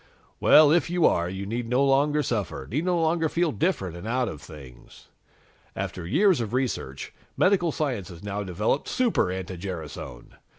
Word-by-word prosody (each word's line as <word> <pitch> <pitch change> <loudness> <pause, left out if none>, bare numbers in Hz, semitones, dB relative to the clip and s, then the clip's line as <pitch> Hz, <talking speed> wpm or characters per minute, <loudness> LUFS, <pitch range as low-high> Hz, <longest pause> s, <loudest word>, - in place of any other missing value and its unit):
Well, 150 -1 +7
if 170 +1 +2
you 175 -1 +2
are, 85 +1 +2
you 95 +1 -5
need 115 +3 -4
no 130 +3 +3
longer 145 +2 +2
suffer, 100 - -3
need 150 - -2
no 180 -2 +1
longer 165 0 +1
feel 170 0 +1
different 135 - -1
and 85 +5 -8
out 125 +1 0
of 75 -7 -7
things. 65 -6 -14 0.7
"After 85 -2 -5
years 175 - +3
of 110 0 -4
research, 120 - -3 0.2
medical 185 -3 +3
science 130 - -2
has 85 -1 -12
now 100 0 -3
developed 105 +8 -1
Super 245 - +1
anti 95 0 -5
gerasone! 80 -9 -8
120 Hz, 170 wpm, -26 LUFS, -, 0.7 s, Well